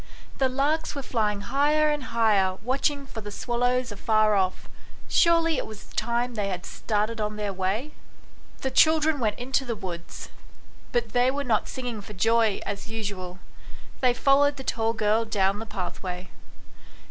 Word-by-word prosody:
The 265 -1 +3
larks 295 +5 0
were 280 - -4
flying 210 -5 0
higher 295 +7 +2
and 295 -3 -2
higher 205 -6 +2
watching 275 +3 0
for 230 -4 -8
the 205 - -7
swallows 245 +2 0
afar 215 +1 +2
off 190 -2 0 0.4
surely 330 -1 +4
it - - -3
was 215 -1 -10
time 235 +2 0
they 205 -3 -1
had 180 -3 -4
started 220 +1 -2
on 210 0 -2
their 210 -1 -3
way? 195 +10 -1 0.7
The 265 - -1
children 315 -1 +4
went 215 -4 0 0.2
to 270 - +3
the 240 -3 -3
woods, 170 -4 -7 0.6
but 235 -2 0
they 245 +1 +4
were 280 +2 -1
not 225 -5 +1
singing 245 -4 -5
for 210 - -10
joy 225 +1 +2
as 200 +1 -5
usual; 200 -5 -5 0.6
they 250 -2 +3
followed 285 +2 +4
the 265 - -6
tall 225 -2 0
girl 220 0 +2
down 200 -2 +1
the 225 - -7
pathway. 185 -2 -5
225 Hz, 160 wpm, -26 LUFS, 205-265 Hz, 0.7 s, surely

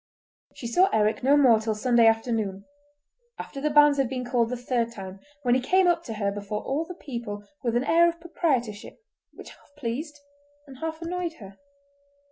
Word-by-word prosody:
She - - -9
saw 360 +12 +3
Eric 215 0 +1
no 275 +3 +4
more 245 -6 +5
till 220 0 -2
Sunday 235 +1 +4
afternoon, 225 -4 0 0.7
after 275 - -7
the 300 - +1
banns 295 -1 +5
had 270 -3 +1
been 250 -1 -4
called 240 -2 +1
the 250 - -3
third 240 -1 -1
time, 195 -3 -9 0.2
when 245 -2 +3
he 255 - +2
came 370 +8 +3
up 345 -1 +2
to 225 - -5
her 200 -2 -1
before 205 +1 -5
all 295 +5 -2
the 360 +1 -9
people 235 - -6 0.2
with 235 -3 -1
an 240 - +2
air 340 +4 +4
of 335 0 -7
proprietorship 265 - -2 0.3
which - - -12
half 285 - -21
pleased 290 +4 -4 0.5
and 265 -3 -13
half 320 +1 -5
annoyed 350 0 -3
her. 195 -9 -13
250 Hz, 190 wpm, -26 LUFS, 225-300 Hz, 0.7 s, more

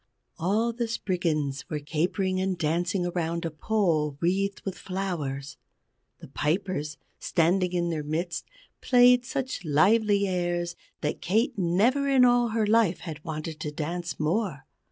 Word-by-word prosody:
All 215 +7 +1
the 235 0 -2
Spriggans 165 -10 -2
were 155 - -2
capering 180 +5 -1
and 190 -1 -1
dancing 175 +4 0
around 170 -1 -2
a 165 - -2
pole 155 -4 0
wreathed 195 +4 0
with 190 -2 -3
flowers. 170 -8 -4 0.6
The - - -10
pipers, 150 0 -2 0.2
standing 180 +2 +2
in 175 -1 0
their 155 -2 -2
midst, 165 +3 -3 0.4
played 250 0 +5
such 260 0 -3
lively 200 +6 +3
airs 175 -1 -1 0.3
that 150 - -2
Kate 225 +8 +1
never 215 +10 +2
in 260 -2 +6
all 245 -1 +4
her 225 -1 0
life 210 -4 +3
had 160 -3 -7
wanted 155 0 -5
to 155 - -3
dance 170 +4 -4
more. 160 -2 -1
175 Hz, 140 wpm, -27 LUFS, 155-205 Hz, 0.6 s, in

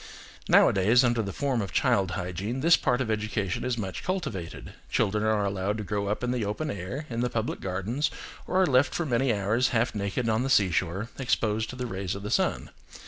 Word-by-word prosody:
Nowadays, 110 +7 +5
under 120 -2 +2
the 100 -2 -4
form 135 0 -1
of 100 - -4
child 115 -8 +2
hygiene, 95 +8 -3
this 165 +3 +6
part 125 +2 +1
of 115 -4 -1
education 105 -3 -2
is 125 -2 -1
much 95 -4 -4
cultivated: 140 - -4 0.2
children 105 +2 +1
are 110 -2 +2
allowed 100 +1 -1
to 105 - -4
grow 100 0 -2
up 105 +4 -2
in 125 - 0
the 125 -3 -1
open 105 +10 -2
air, 100 - -5
in 115 -1 -4
the 125 - +1
public 115 -1 -2
gardens, 95 +10 -1 0.4
or 185 - +1
are - - +5
left 135 -2 +3
for 170 - -1
many 130 -1 +1
hours 110 +4 +1
half 120 +1 +1
naked 105 +3 -2
on 110 +1 +2
the 135 - -1
seashore, 95 -1 +1
exposed 110 -4 0
to - - -6
the 125 0 -4
rays 95 -5 -3
of 100 - -7
the 105 - -4
sun. - - 0
110 Hz, 210 wpm, -27 LUFS, 100-125 Hz, 0.4 s, this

